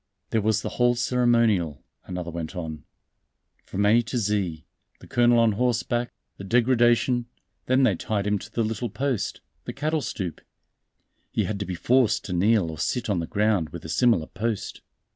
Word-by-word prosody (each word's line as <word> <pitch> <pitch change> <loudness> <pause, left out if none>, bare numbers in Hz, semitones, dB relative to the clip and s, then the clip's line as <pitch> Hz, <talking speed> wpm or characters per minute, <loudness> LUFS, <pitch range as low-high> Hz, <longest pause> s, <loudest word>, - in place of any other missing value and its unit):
"There 110 - +2
was 105 0 +1
the - - -2
whole 120 0 +4
ceremonial," 115 - +2 0.2
another 90 -2 -5
went 85 +1 -5
on, 80 -4 -6 0.8
"from 100 +2 -1
A 110 +3 +5
to 125 +2 -4
Z 100 -8 -1 0.3
the - - -14
colonel 120 0 +3
on 115 -1 +4
horseback, 120 +1 0 0.3
the - - -8
degradation; 120 +2 +3 0.4
then 130 +1 +3
they 120 -6 +4
tied 100 +3 -2
him 105 0 +1
to - - -11
the 115 - 0
little 115 +2 -2
post, 115 -1 -2 0.2
the - - -5
cattle 155 +2 -1
stoup. 90 - -4 0.9
He - - 0
had 105 -2 -3
to 100 - -4
be 90 - -3
forced 120 +3 +2
to 95 - -4
kneel 95 -1 +2
or 80 - -9
sit 120 -3 -1
on 95 - +1
the 85 - -3
ground 105 -6 +1
with 85 -2 -9
a - - -6
similar 105 -1 +3
post." 110 +4 -4
110 Hz, 180 wpm, -25 LUFS, 95-120 Hz, 0.9 s, A